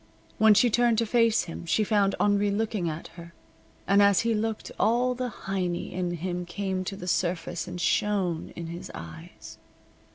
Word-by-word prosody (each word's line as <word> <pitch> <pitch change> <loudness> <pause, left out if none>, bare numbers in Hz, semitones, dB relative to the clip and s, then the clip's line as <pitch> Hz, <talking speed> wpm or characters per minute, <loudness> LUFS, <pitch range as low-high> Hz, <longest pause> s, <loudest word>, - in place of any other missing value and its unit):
When 220 -1 +6
she 235 +3 +4
turned 240 0 +3
to 230 - +2
face 230 0 +3
him 165 - -7
she 215 - +2
found 200 -2 +2
Henri 205 0 +2
looking 205 -4 -1
at 155 +1 -6
her, 170 0 -13 0.5
and 200 +1 +5
as 200 -1 +5
he 230 0 +1
looked 220 0 -3
all 245 +3 +2
the 250 0 -3
Heiny 185 -5 -3
in 180 -1 -2
him 180 +1 -3
came 190 +1 -3
to 195 - -4
the 180 - -8
surface 170 -1 -1
and 180 0 -6
shone 180 -1 0
in 170 - -6
his 170 +2 -7
eyes. 80 -1 -11
195 Hz, 175 wpm, -27 LUFS, 175-220 Hz, 0.5 s, When